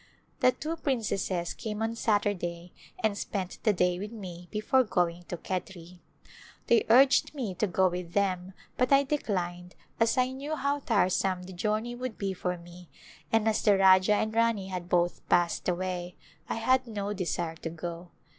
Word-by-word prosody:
The 255 - +5
two 320 +3 -4
princesses 200 - -1
came 215 -1 -4
on 225 +1 -1
Saturday 180 -6 -1 0.3
and 215 -2 +2
spent 195 -2 -4
the 215 - +3
day 180 -2 +1
with 205 +2 -5
me 180 -6 -8
before 215 +5 +2
going 175 -5 -1
to 175 - -5
Khetri. 180 -1 -6 0.7
They 235 - +3
urged 265 +5 +5
me 235 -9 -3
to 185 +4 0
go 185 +1 +3
with 180 -1 -4
them 190 -2 0 0.2
but 250 +1 +1
I 275 0 +6
declined 180 -11 -3 0.2
as 230 +2 +3
I 255 0 +2
knew 280 +4 -4
how 285 -1 0
tire 220 -8 +2
some 185 0 0
the 185 +1 -9
journey 215 +6 -1
would 250 -2 -5
be 195 -1 -2
for 180 -1 -3
me 175 0 -14 0.4
and 225 -1 +3
as 220 -1 +2
the 205 -2 +4
Rajah 190 +1 +6
and 220 +1 -1
Rani 225 -4 +1
had 180 -2 -5
both 175 0 +1
passed 175 +1 +2
away 180 0 -3 0.3
I - - -1
had 255 +3 +2
no 205 -2 -3
desire 175 -3 -2
to 165 - -5
go. 170 +1 -7
195 Hz, 175 wpm, -29 LUFS, 180-225 Hz, 0.7 s, I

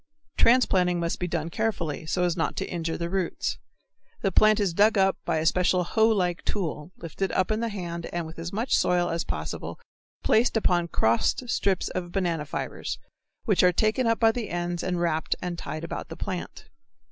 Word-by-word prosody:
Transplanting 185 -8 +4
must 170 0 -2
be 180 - -1
done 165 -2 -2
carefully, 170 -8 -2
so 180 - 0
as 175 -2 +1
not 165 - -1
to - - -2
injure 165 -2 -3
the 170 - -2
roots. 185 0 -2 0.6
The 195 - +1
plant 215 +3 +5
is 195 -5 +1
dug 210 +4 +4
up 195 0 +4
by - - +1
a 155 - -1
special 180 +1 +3
hoe 220 +5 +3
like 180 -6 +1
tool, 165 -5 -3
lifted 175 +3 -3
up 185 +3 +1
in 215 - +1
the 230 0 -1
hand 170 -5 -5 0.2
with 160 +1 -10
as 170 +1 -5
much 225 +6 +1
soil 175 -1 +2
as 165 0 -1
possible, - - -5 0.4
placed 230 +1 +3
upon 175 -5 +2
crossed 115 - +1
strips 195 -2 +1
of 175 -1 -4
banana 170 -6 -1
fibres, - - -4 0.5
which 205 -5 +3
are 180 - +6
taken 220 +7 +1
up 230 0 +2
by 225 -1 +5
the 225 -3 -4
ends 175 0 -2
and 180 -2 -1
wrapped 160 -2 0
and 175 -2 -4
tied 155 +1 -5
about 170 - -5
the - - -8
plant. 185 -3 -5
180 Hz, 195 wpm, -26 LUFS, 170-205 Hz, 0.6 s, are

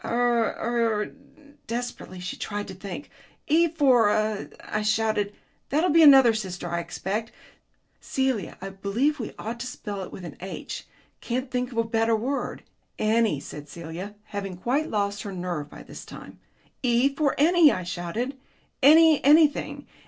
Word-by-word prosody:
"Er 240 -1 +1
er 230 -3 0 0.3
" 290 -1 -23
Desperately 235 -5 -5
she 180 - -5
tried 205 -1 -4
to 190 - -7
think. 195 +8 -8 0.3
"E 330 +3 +4
for 270 -9 +4
er," 215 -1 0
I 215 - -2
shouted. 215 -1 +1 0.4
"That'll 310 +5 +2
be 330 +2 +6
another 270 -6 +8
sister, 185 -5 -4
I 170 0 -1
expect... 195 +6 -4 0.7
Celia, 265 -8 -1
I 195 - -5
believe 210 +10 -1
we 225 - -5
ought 230 +2 -5
to 255 - -4
spell 205 -5 -6
it 185 - -7
with 180 - -8
an 160 - -9
'H.' 190 +2 -7 0.3
Can't 255 +2 -2
you 255 - -23
think 250 0 -1
of 235 - -8
a 230 - +3
better 225 0 +1
word?" 255 +6 -3 0.3
"Enny," 220 -7 +2
said 145 +1 -9
Celia, 170 +6 -7
having 200 -4 -6
quite 270 - 0
lost 205 -1 -1
her 200 - -6
nerve 175 -5 -4
by - - -11
this - - -10
time. - - -11 0.4
"E 250 +2 +3
for 285 -1 +1
enny," 325 0 +6
I 185 - -3
shouted. 180 +10 -3 0.5
"Any 315 +2 +7
anything. 300 +1 +4
225 Hz, 165 wpm, -26 LUFS, 195-265 Hz, 0.7 s, another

